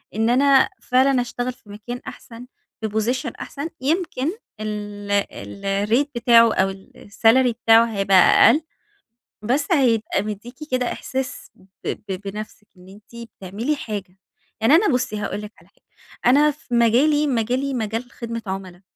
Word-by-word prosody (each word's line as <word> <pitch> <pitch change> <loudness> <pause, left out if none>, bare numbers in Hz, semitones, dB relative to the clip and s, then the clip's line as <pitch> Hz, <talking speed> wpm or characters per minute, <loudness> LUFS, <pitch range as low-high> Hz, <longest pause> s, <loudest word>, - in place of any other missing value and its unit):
إن 225 +1 +1
أنا 270 +1 +4
فعلًا 260 0 +3
أشتغل 245 +1 -4
في 210 - -24
مكان 240 +4 -7
أحسن 235 +1 -10 0.4
في 220 - -2
Position 235 +4 -1
أحسن، 290 +3 -6
يمكن 315 -1 -1 0.3
ال 205 -1 -5 0.2
الRate 200 +7 -1
بتاعه 230 -1 +5
أو 190 0 +1
الsalary 225 +6 +1
بتاعه 225 0 +6
هيبقى 195 -4 +2
أقل، 295 - +6 0.8
بس 275 - 0
هيبقى 240 -8 +2
بيدّيكِ 215 +4 -7 0.2
كده 250 -1 0
إحساس 260 -1 -5
ب 185 - -22 0.4
ب 195 - -2
بنفسِك 210 +1 -8
إن 180 +1 -16
أنتِ 225 +4 -12
بتعملي 215 +11 -3
حاجة، 195 -6 -7 0.4
يعني 225 +7 +5
أنا 390 +6 +4
بُصي 250 -6 0
هاقول 210 0 -4
لِك 210 - -9
على - - -23
حاجة، - - -36 0.4
أنا 290 +4 +5
في 290 -4 -8
مجالي، 270 +6 +3
مجالي 255 +2 -1
مجال 225 +1 -3
خدمة 230 -1 -6
عملا، 190 -1 -6
230 Hz, 140 wpm, -22 LUFS, 210-260 Hz, 0.8 s, بتاعه